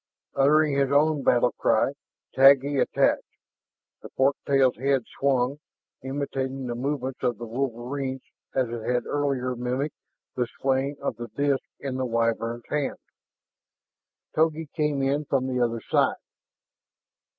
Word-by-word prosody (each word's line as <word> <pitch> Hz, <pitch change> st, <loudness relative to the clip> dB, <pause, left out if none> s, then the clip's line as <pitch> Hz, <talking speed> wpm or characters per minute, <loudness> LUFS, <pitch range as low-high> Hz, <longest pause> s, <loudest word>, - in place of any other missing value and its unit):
Uttering 150 Hz, +2 st, +4 dB
his 140 Hz, -1 st, +1 dB
own 150 Hz, +1 st, +3 dB
battle 120 Hz, -1 st, +3 dB
cry, 115 Hz, +3 st, +3 dB, 0.4 s
Taggi 135 Hz, +1 st, +6 dB
attacked. -, -, +2 dB, 0.8 s
The -, -, -10 dB
fork 135 Hz, +1 st, +2 dB
tail's 135 Hz, -4 st, +3 dB
head 135 Hz, 0 st, +1 dB, 0.2 s
swung, 135 Hz, 0 st, +1 dB, 0.4 s
imitating 135 Hz, -1 st, -3 dB
the 120 Hz, -, -3 dB
movements 130 Hz, +1 st, -3 dB
of 120 Hz, -3 st, 0 dB
the 120 Hz, -, -6 dB
wolverine 130 Hz, +2 st, -3 dB, 0.4 s
as 130 Hz, -2 st, +2 dB
it 120 Hz, -1 st, -5 dB
had 125 Hz, +2 st, -1 dB
earlier 135 Hz, -3 st, -1 dB
mimicked 125 Hz, +5 st, -2 dB, 0.4 s
the 125 Hz, -1 st, 0 dB
swaying 135 Hz, +1 st, 0 dB
of -, -, -2 dB
the 120 Hz, 0 st, -6 dB
disk 140 Hz, +3 st, 0 dB
in 135 Hz, -2 st, -4 dB
the 130 Hz, -1 st, -1 dB
Wyvern's 115 Hz, 0 st, -1 dB
hand. 150 Hz, -2 st, -1 dB, 1.4 s
Togi 160 Hz, -1 st, +1 dB
came 150 Hz, -3 st, 0 dB
in 140 Hz, +2 st, 0 dB
from 135 Hz, -2 st, 0 dB
the 125 Hz, -1 st, 0 dB
other 115 Hz, -1 st, -1 dB
side. -, -, +2 dB
135 Hz, 135 wpm, -26 LUFS, 125-140 Hz, 1.4 s, Taggi